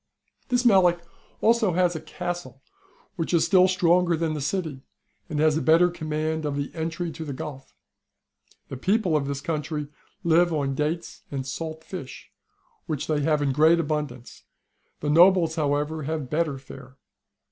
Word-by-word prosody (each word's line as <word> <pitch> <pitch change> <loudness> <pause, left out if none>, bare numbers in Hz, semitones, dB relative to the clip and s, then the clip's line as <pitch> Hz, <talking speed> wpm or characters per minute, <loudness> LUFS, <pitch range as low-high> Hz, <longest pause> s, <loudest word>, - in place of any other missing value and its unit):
This 250 0 +2
Melic 185 -6 +5
has 170 0 -24 0.3
also 225 -3 +3
a 175 -2 +2
castle 175 -7 -6 0.5
which 165 +1 0
is 165 - +3
still 185 -2 +5
stronger 180 -2 +3
than 160 -1 -1
the 150 - -4
city, 150 -2 -3 0.5
and 150 -3 -2
has 155 0 +3
a - - -1
better 170 +3 +4
command 155 -1 -3
of 145 -2 -2
the 140 0 -4
entry 165 +1 -3
to 160 - -7
the 145 -4 -5
Gulf^ 135 -1 -8 1.0
The 135 - -6
people 190 - +1
of 140 -2 0
this 140 0 -3
country 150 -2 -3 0.3
live 170 +1 +4
on 140 -3 -1
dates 155 +4 -3
and 135 -2 -4
salt 160 +3 -5
fish, 150 -8 -9 0.6
which 150 -3 -2
they 155 -2 0
have 150 0 +1
in 140 - +1
great 160 +4 +5
abundance; 150 -6 -4 0.6
the 145 - -1
nobles, 170 0 +5
however, 150 0 -1
have 155 -2 -4
better 155 -3 0
fare. 135 0 -13
160 Hz, 160 wpm, -25 LUFS, 145-175 Hz, 1.0 s, Melic